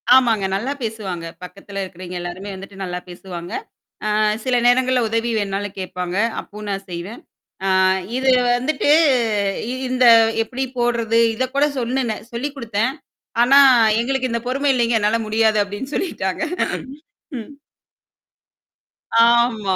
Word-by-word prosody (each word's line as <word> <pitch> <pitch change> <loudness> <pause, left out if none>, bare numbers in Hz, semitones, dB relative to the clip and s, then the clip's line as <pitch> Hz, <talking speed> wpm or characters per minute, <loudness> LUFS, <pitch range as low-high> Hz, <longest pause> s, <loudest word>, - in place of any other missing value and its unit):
ஆமாங்க. 225 -6 +3
நல்லா 245 +8 -2
பேசுவாங்க. 195 -6 -4 0.2
பக்கத்துல 195 +2 -7
இருக்கிறவய்ங்க 180 -1 -8
எல்லாருமே, 180 +3 -6
வந்துட்டு 195 +1 -11
நல்லா 180 -1 -4
பேசுவாங்க. 175 -1 -8 0.7
அ - - +2 0.3
சில 255 -1 +1
நேரங்கள்ல 255 +1 +3
உதவி 230 +1 -1
வேணுாலும் 200 0 -3
கேப்பாங்க. 180 0 -4 0.2
அப்பவும் 210 0 -10
நான் 195 0 -4
செய்வேன். 175 +7 -7 0.4
ஆ - - +1 0.5
இது 260 0 +2 0.2
வந்துட்டு 280 +3 0 1.0
இந்த 255 0 +1 0.4
எப்படி 260 +4 -3
போடுறது? 230 -1 +1
இத 260 +3 -1
கூட 285 - +4
சொல்னுனேன் 240 -3 -2
சொல்லிக் 275 +5 -4
குடுத்தன். 230 +1 -1 0.5
ஆனா, 275 +3 +6 0.4
எங்களுக்கு 260 +1 -1
இந்த 235 0 -1
பொறுமை 275 +2 0
இல்லீங்க 235 -1 +1
என்னால 210 +2 +1
முடியாது 220 0 +2
அப்டின்னு 205 +8 -7
சொல்லிட்டாங்க. 190 - -2 1.0
ம். 220 - -9 1.8
ஆமா. 235 -5 +2
225 Hz, 120 wpm, -20 LUFS, 195-250 Hz, 1.8 s, ஆனா